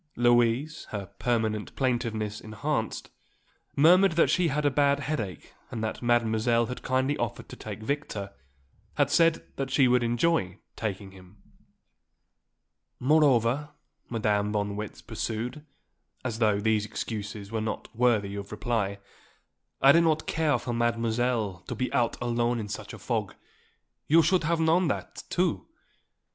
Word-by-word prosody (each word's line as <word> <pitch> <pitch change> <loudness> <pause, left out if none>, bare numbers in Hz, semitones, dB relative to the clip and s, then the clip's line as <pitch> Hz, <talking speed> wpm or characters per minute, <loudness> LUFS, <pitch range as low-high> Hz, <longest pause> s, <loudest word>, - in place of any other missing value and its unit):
Louise, 120 +5 +2
her 105 -2 -4
permanent 110 -3 -1
plaintiveness 115 -5 -1
enhanced, 110 -1 -3 0.6
murmured 180 +5 +6
that 165 - +3
she 180 -2 +3
had 150 0 -1
a 145 - +4
bad 140 +1 +2
headache 115 - -4 0.2
and 110 -2 -4
that 110 - -3
Mademoiselle 120 0 +2
had 125 +2 -6
kindly 130 +2 +1
offered - - -3
to - - -8
take 110 - -8
Victor, 110 -7 -3 0.6
had - - +2
said 165 -1 +3
that 135 -1 -2
she 135 0 +4
would 125 0 +3
enjoy 120 - +1 0.2
taking 100 -3 -4
him. 95 +1 -16 1.6
"Moreover," 145 0 +3 0.3
Madame 105 -3 0
von 105 -1 0
Marwitz 105 +1 -6
pursued, 120 +7 -4 0.6
as 115 -3 -3
though 105 -3 +3
these 110 0 +2
excuses 105 -1 -5
were 110 -1 -1
not 110 0 -4
worthy 110 -5 +2
of 100 0 -6
reply, 105 -2 -1 0.9
"I 135 - +9
do 170 - +6
not 155 -2 +1
care 155 -4 +1
for 120 0 -4
Mademoiselle 115 -3 0
to - - -4
be 130 - -2
out 120 -2 +1
alone 120 0 0
in 105 -2 -5
such 105 - -6
a - - -8
fog. - - -2 0.7
You 165 +2 +6
should 175 +1 +2
have 165 +1 +1
known 165 +2 +3
that, 100 -9 -4
too. - - 0
120 Hz, 145 wpm, -27 LUFS, 110-140 Hz, 1.6 s, I